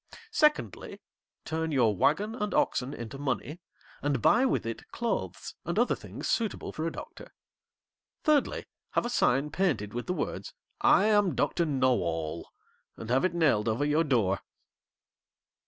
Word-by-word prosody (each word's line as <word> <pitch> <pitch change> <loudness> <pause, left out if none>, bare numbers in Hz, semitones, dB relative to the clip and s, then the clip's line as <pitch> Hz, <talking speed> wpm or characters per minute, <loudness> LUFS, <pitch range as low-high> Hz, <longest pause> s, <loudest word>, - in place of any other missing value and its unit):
Secondly, 300 -7 +1 0.5
turn 160 0 -2
your 120 -7 +3
wagon 205 - +2
and 210 -4 -2
oxen 125 +2 +1
into 120 +1 -7
money, 145 +3 -3 0.4
and 145 -2 0
buy 240 - +4
with - - 0
it 115 0 -6
clothes 235 -1 -3
and - - -3
other - - +3
things - - -7
suitable 225 -3 -1
for 160 +1 -2
a - - -2
Doctor. - - -10 0.9
Thirdly, 300 -3 +2 0.3
have - - +1
a 240 - -2
sign 140 - +2
painted 110 - 0
with 120 +1 -4
the 180 - 0
words, - - -4 0.3
"I 300 -8 +5
am 205 -7 +3
Doctor 165 +3 +1
Know 130 -3 +2
all," 80 -1 -3 0.5
and 115 - -6
have 130 +2 +3
it 185 -2 +1
nailed 140 -10 +3
over 115 +6 0
your 150 +2 +3
door.' 110 - +1
145 Hz, 155 wpm, -29 LUFS, 120-200 Hz, 0.9 s, I